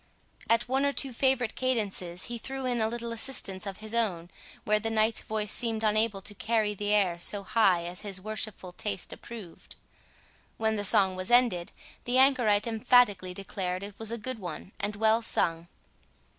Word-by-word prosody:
At 230 Hz, +1 st, +2 dB
one 265 Hz, +2 st, +1 dB
or 280 Hz, 0 st, +1 dB
two 270 Hz, -2 st, 0 dB
favourite 255 Hz, -2 st, +1 dB
cadences, 200 Hz, -8 st, -2 dB
he 240 Hz, -1 st, -5 dB
threw 270 Hz, +2 st, -5 dB
in 245 Hz, -2 st, 0 dB
a 220 Hz, -, +2 dB
little 235 Hz, +1 st, -4 dB
assistance 220 Hz, -5 st, +1 dB
of 195 Hz, -1 st, -5 dB
his 215 Hz, +1 st, -7 dB
own, 185 Hz, -7 st, 0 dB, 0.3 s
where 210 Hz, 0 st, +2 dB
the 225 Hz, +1 st, -2 dB
knight's 220 Hz, 0 st, +1 dB
voice 215 Hz, -1 st, -2 dB
seemed 225 Hz, -2 st, 0 dB
unable 215 Hz, -2 st, +1 dB
to 205 Hz, -, -5 dB
carry 215 Hz, 0 st, 0 dB
the 205 Hz, 0 st, -2 dB
air 190 Hz, -5 st, +2 dB
so 200 Hz, +3 st, 0 dB
high 195 Hz, -4 st, +3 dB
as 175 Hz, +1 st, -4 dB
his 195 Hz, -2 st, -3 dB
worshipful 215 Hz, -2 st, -5 dB
taste 195 Hz, 0 st, -4 dB
approved. 215 Hz, -8 st, -10 dB, 0.8 s
When 220 Hz, 0 st, 0 dB
the 205 Hz, -, -2 dB
song 190 Hz, -1 st, +4 dB
was 185 Hz, 0 st, -3 dB
ended, 240 Hz, -8 st, +3 dB, 0.3 s
the 245 Hz, +1 st, +1 dB
anchorite 245 Hz, -6 st, +4 dB
emphatically 215 Hz, -5 st, +3 dB
declared 185 Hz, -1 st, -4 dB
it 200 Hz, 0 st, -8 dB, 0.2 s
a 235 Hz, -, -2 dB
good 250 Hz, +2 st, -3 dB
one, 180 Hz, 0 st, -7 dB
and 205 Hz, +1 st, -2 dB
well 220 Hz, +2 st, +3 dB
sung. 165 Hz, -6 st, 0 dB
215 Hz, 175 wpm, -28 LUFS, 195-235 Hz, 0.8 s, song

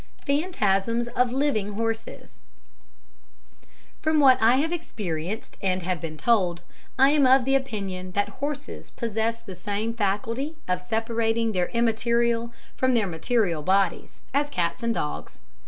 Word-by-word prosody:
Phantasms 235 Hz, -, +1 dB
of 250 Hz, 0 st, +1 dB
Living 245 Hz, -7 st, 0 dB
Horses 225 Hz, +1 st, -4 dB, 1.6 s
From 315 Hz, 0 st, +2 dB
what 260 Hz, -3 st, +6 dB
I 230 Hz, +3 st, +6 dB
have 305 Hz, +5 st, +1 dB
experienced 205 Hz, -, -4 dB
and 185 Hz, -2 st, 0 dB
have 180 Hz, -2 st, -2 dB
been 155 Hz, -2 st, -6 dB
told, 180 Hz, -5 st, +1 dB, 0.3 s
I 270 Hz, +2 st, +6 dB
am 290 Hz, -3 st, +4 dB
of 260 Hz, -1 st, +5 dB
the 270 Hz, -, +2 dB
opinion 195 Hz, -8 st, -2 dB
that 205 Hz, +1 st, +1 dB
horses 290 Hz, 0 st, -5 dB
possess 230 Hz, 0 st, -2 dB
the 195 Hz, -5 st, -9 dB
same 205 Hz, +5 st, -2 dB
faculty 230 Hz, +8 st, -1 dB
of 180 Hz, 0 st, 0 dB
separating 225 Hz, +2 st, 0 dB
their 180 Hz, -3 st, 0 dB
immaterial 235 Hz, 0 st, +1 dB, 0.2 s
from 260 Hz, -1 st, +2 dB
their 220 Hz, -3 st, +3 dB
material 180 Hz, -1 st, 0 dB
bodies, 190 Hz, +2 st, 0 dB
as 290 Hz, +1 st, +1 dB
cats 175 Hz, -2 st, -1 dB
and 235 Hz, 0 st, 0 dB
dogs. 150 Hz, -, -4 dB
225 Hz, 140 wpm, -25 LUFS, 195-255 Hz, 1.6 s, what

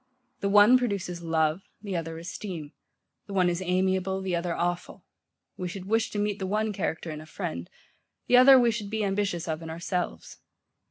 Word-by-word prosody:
The 200 Hz, -, -1 dB
one 210 Hz, +5 st, +7 dB
produces 195 Hz, -7 st, -2 dB
love, 160 Hz, +1 st, +1 dB, 0.2 s
the 200 Hz, -2 st, -5 dB
other 165 Hz, -1 st, -3 dB
esteem: 170 Hz, -2 st, -6 dB, 0.6 s
the 200 Hz, -, -7 dB
one 180 Hz, -2 st, +3 dB
is 175 Hz, +1 st, -3 dB
amiable, 190 Hz, +1 st, 0 dB
the 185 Hz, -2 st, -1 dB
other 170 Hz, 0 st, -2 dB
awful: 175 Hz, +1 st, -3 dB, 0.5 s
we 180 Hz, -, -3 dB
should 185 Hz, +1 st, -7 dB
wish 225 Hz, +3 st, +1 dB
to -, -, -5 dB
meet 205 Hz, 0 st, -1 dB
the 190 Hz, -, -3 dB
one 215 Hz, +2 st, 0 dB
character 160 Hz, -3 st, -3 dB
in 155 Hz, 0 st, -6 dB
a 155 Hz, -, -12 dB
friend; 85 Hz, -, -5 dB, 0.6 s
the 245 Hz, -, +4 dB
other 265 Hz, +1 st, +9 dB
we 240 Hz, -1 st, +4 dB
should 215 Hz, -2 st, -4 dB
be 220 Hz, 0 st, -1 dB
ambitious 195 Hz, -4 st, -1 dB
of 160 Hz, 0 st, -3 dB
in 165 Hz, -, -7 dB
ourselves. 175 Hz, +2 st, -4 dB
185 Hz, 185 wpm, -27 LUFS, 170-205 Hz, 0.6 s, other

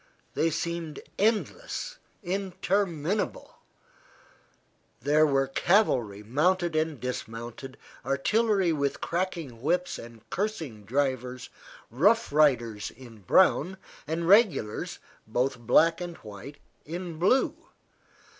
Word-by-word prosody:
They 165 Hz, -, +2 dB
seemed 165 Hz, -1 st, -3 dB, 0.2 s
endless, -, -, -1 dB, 0.2 s
interminable; 190 Hz, -1 st, -1 dB, 1.4 s
there 150 Hz, +5 st, +4 dB
were 135 Hz, -1 st, +2 dB
cavalry 130 Hz, -, +2 dB
mounted 170 Hz, -, +1 dB
and 155 Hz, -3 st, 0 dB
dismounted, 125 Hz, +1 st, -6 dB, 0.3 s
artillery 190 Hz, -, +2 dB
with 140 Hz, -2 st, -1 dB
cracking 170 Hz, -9 st, -3 dB
whips 175 Hz, +6 st, 0 dB
and 115 Hz, -1 st, -12 dB
cursing 160 Hz, -, -3 dB
drivers, 130 Hz, 0 st, -2 dB, 0.4 s
Rough 205 Hz, -, +3 dB
Riders 120 Hz, -8 st, +2 dB
in 120 Hz, -3 st, -14 dB
brown, 185 Hz, -, +3 dB, 0.3 s
and 165 Hz, +2 st, -2 dB
regulars, 195 Hz, -, +3 dB, 0.3 s
both 125 Hz, +3 st, 0 dB
black 165 Hz, +8 st, +4 dB
and 175 Hz, -1 st, -5 dB
white, 105 Hz, +8 st, -10 dB, 0.3 s
in 170 Hz, 0 st, -6 dB
blue. 200 Hz, +10 st, +3 dB
155 Hz, 95 wpm, -28 LUFS, 125-185 Hz, 1.4 s, there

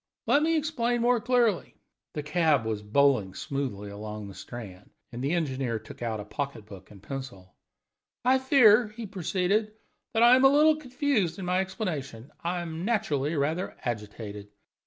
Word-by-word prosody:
"Let 285 Hz, -, +4 dB
me 325 Hz, +1 st, +2 dB
explain 245 Hz, -6 st, 0 dB
more 240 Hz, -1 st, +3 dB
clearly." 240 Hz, -6 st, +1 dB, 0.4 s
The 150 Hz, -, -3 dB
cab 150 Hz, -5 st, +2 dB
was 110 Hz, -2 st, -2 dB
bowling 105 Hz, -3 st, +2 dB
smoothly 105 Hz, -4 st, -4 dB
along 105 Hz, 0 st, -7 dB
the -, -, -10 dB
Strand, 95 Hz, 0 st, -9 dB, 0.2 s
and 120 Hz, +2 st, -6 dB
the 140 Hz, +4 st, 0 dB
engineer 135 Hz, -8 st, -1 dB
took 110 Hz, -, -12 dB
out 115 Hz, -2 st, -2 dB
a 105 Hz, -, -6 dB
pocket 140 Hz, -2 st, -5 dB
book 95 Hz, -3 st, -12 dB
and 100 Hz, -2 st, -15 dB
pencil. 125 Hz, -10 st, -8 dB, 0.7 s
"I 260 Hz, +1 st, +5 dB
fear," 245 Hz, -4 st, +6 dB
he 220 Hz, +2 st, -8 dB
proceeded, 195 Hz, +2 st, 0 dB, 0.4 s
"that 225 Hz, -, +4 dB
I 240 Hz, +1 st, +8 dB
am 260 Hz, -, +3 dB
a 270 Hz, -, +8 dB
little 305 Hz, +2 st, +5 dB
confused 255 Hz, -, 0 dB
in 190 Hz, -, -5 dB
my 180 Hz, +1 st, +1 dB
explanation 155 Hz, -, -4 dB
I 175 Hz, +1 st, -1 dB
am 165 Hz, 0 st, -5 dB
naturally 155 Hz, -, 0 dB
rather 155 Hz, +6 st, -1 dB
agitated. 105 Hz, -3 st, -5 dB
155 Hz, 165 wpm, -28 LUFS, -, 0.7 s, I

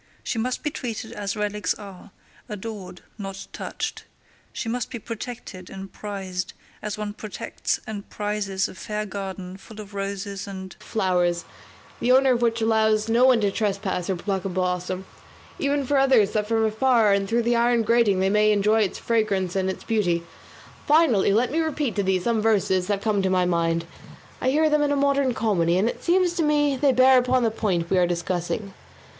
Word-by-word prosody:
She 230 Hz, -, -2 dB
must 250 Hz, +3 st, -2 dB
be 300 Hz, -, -1 dB
treated 225 Hz, -4 st, -5 dB
as 205 Hz, -3 st, -4 dB
relics 210 Hz, 0 st, -1 dB
are; 200 Hz, -1 st, -11 dB, 0.4 s
adored, 205 Hz, -3 st, -7 dB, 0.2 s
not 195 Hz, -1 st, -6 dB
touched. -, -, -5 dB, 0.5 s
She -, -, -5 dB
must 240 Hz, +1 st, -2 dB
be -, -, -5 dB
protected 225 Hz, -4 st, -7 dB
and 195 Hz, 0 st, -9 dB
prized 190 Hz, -3 st, -5 dB, 0.3 s
as 210 Hz, -1 st, -4 dB
one 210 Hz, -1 st, -4 dB
protects 215 Hz, -1 st, -4 dB
and 205 Hz, -2 st, -7 dB
prizes 205 Hz, -2 st, -2 dB
a -, -, -10 dB
fair 210 Hz, +2 st, -4 dB
garden 190 Hz, -2 st, -6 dB
full 215 Hz, +2 st, -13 dB
of 205 Hz, -1 st, -9 dB
roses 200 Hz, 0 st, -4 dB
and 190 Hz, -1 st, -8 dB
flowers, 180 Hz, -4 st, 0 dB, 0.5 s
the 250 Hz, -, +2 dB
owner 265 Hz, +1 st, +5 dB
of 240 Hz, -, -1 dB
which 230 Hz, -1 st, +1 dB
allows 220 Hz, -1 st, +2 dB
no 235 Hz, +3 st, +5 dB
one 255 Hz, -3 st, +5 dB
to 200 Hz, -1 st, +2 dB
trespass 195 Hz, -4 st, -2 dB
or 190 Hz, -, +1 dB
pluck 190 Hz, +1 st, -2 dB
a 195 Hz, -, -2 dB
blossom; 180 Hz, 0 st, -2 dB, 0.5 s
enough 280 Hz, -1 st, 0 dB
for 285 Hz, 0 st, +3 dB
others 260 Hz, -7 st, +4 dB
that 210 Hz, -1 st, -1 dB
from 225 Hz, 0 st, +2 dB
afar 220 Hz, -1 st, +3 dB
and 195 Hz, 0 st, 0 dB
through 235 Hz, +1 st, +2 dB
the 240 Hz, +1 st, +2 dB
iron 235 Hz, 0 st, +3 dB
grating 225 Hz, -4 st, +3 dB
they 190 Hz, -, +3 dB
may 210 Hz, +1 st, +4 dB
enjoy 210 Hz, +2 st, +3 dB
its 200 Hz, -, 0 dB
fragrance 200 Hz, -6 st, 0 dB
and 190 Hz, -1 st, +1 dB
its 190 Hz, -, -5 dB
beauty. 180 Hz, -7 st, +1 dB, 0.6 s
Finally 290 Hz, -11 st, +4 dB
let 235 Hz, +4 st, +2 dB
me 320 Hz, -, 0 dB
repeat 305 Hz, -5 st, -1 dB
to 205 Hz, -, +1 dB
thee 190 Hz, -1 st, +1 dB
some 225 Hz, +4 st, 0 dB
verses 190 Hz, -4 st, +2 dB
that 200 Hz, -1 st, -1 dB
come 210 Hz, -3 st, +1 dB
to 190 Hz, -, +1 dB
my 185 Hz, -1 st, +2 dB
mind; 170 Hz, -1 st, +1 dB, 0.6 s
I 260 Hz, -, +2 dB
heard 310 Hz, +2 st, +3 dB
them 300 Hz, -, +4 dB
in 290 Hz, -1 st, +2 dB
a -, -, +2 dB
modern 280 Hz, -2 st, +2 dB
comedy, 180 Hz, -6 st, +2 dB
and 200 Hz, +4 st, +2 dB
it -, -, -4 dB
seems 355 Hz, 0 st, +3 dB
to 335 Hz, -, +2 dB
me 295 Hz, -2 st, +2 dB
they 275 Hz, +1 st, +3 dB
bear 255 Hz, +1 st, +6 dB
upon 250 Hz, 0 st, +2 dB
the 225 Hz, -, +2 dB
point 180 Hz, -6 st, -1 dB
we 190 Hz, -, +4 dB
are 175 Hz, -, +3 dB
discussing. 175 Hz, +3 st, -2 dB
210 Hz, 195 wpm, -24 LUFS, 190-235 Hz, 0.6 s, bear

